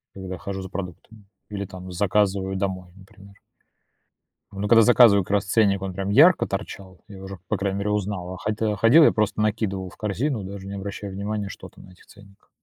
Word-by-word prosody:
когда 95 -2 -7
хожу 100 -1 -5
за 95 - -8
продуктами 100 +3 -9 0.2
или 100 -1 -4
там 95 -1 -10
заказываю 95 0 0
домой, 95 -2 -4
например. 100 +1 -17 1.2
Ну, 100 +1 -4
когда 115 +2 +6
я - - +7
заказываю, 115 -5 +6
как - - -7
раз 100 -1 +2
ценник, 100 -1 +2
он 95 -1 -4
прям 95 +1 -4
ярко 155 - +5
торчал, 95 -2 -7
я 100 - -11
его 95 0 -10
уже, 95 -1 -8
по - - 0
крайней 100 0 -2
мере, 105 +1 -2
узнал. 100 -3 -3
А - - -10
ходил 110 +2 -2
я 105 - -2
ходил 120 +10 +6
я - - +5
просто 110 0 -1
накидывал 100 -4 -2
в - - -18
корзину, 110 +3 -2
даже 95 0 -8
не 100 - -7
обращая 100 +1 -6
внимания, 100 +1 -4
что - - -10
там - - -17
на - - -15
этих 90 - -21
ценниках. 100 -2 -19
100 Hz, 215 wpm, -23 LUFS, 95-105 Hz, 1.2 s, я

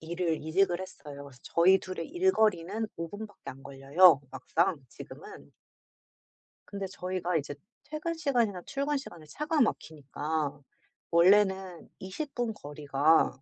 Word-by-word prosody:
일을 170 0 -2
이직을 175 +3 +1
했어요. 150 -6 -9
그래서 140 -3 -14
저희 185 +3 +4
2 185 0 -8
의 165 - -3
일거리는 220 - +1
5 165 0 -4
분밖에 205 +2 -8
안 135 +1 -13
걸려요, 140 +4 +5
막상 160 +7 0
지금은. - - -12 1.2
근데 200 -1 -5
저희가 180 -2 -2
이제 145 -1 -4 0.3
퇴근 310 +2 -4
시간이나 240 - 0
출근 280 +1 -1
시간에 175 - -9
차가 300 - -1
막히니까 150 - -2 0.5
원래는 190 0 +3
20 235 +11 -6
분 240 -2 -1
거리가 145 -3 +1
180 Hz, 275 characters per minute, -29 LUFS, 155-210 Hz, 1.2 s, 걸려요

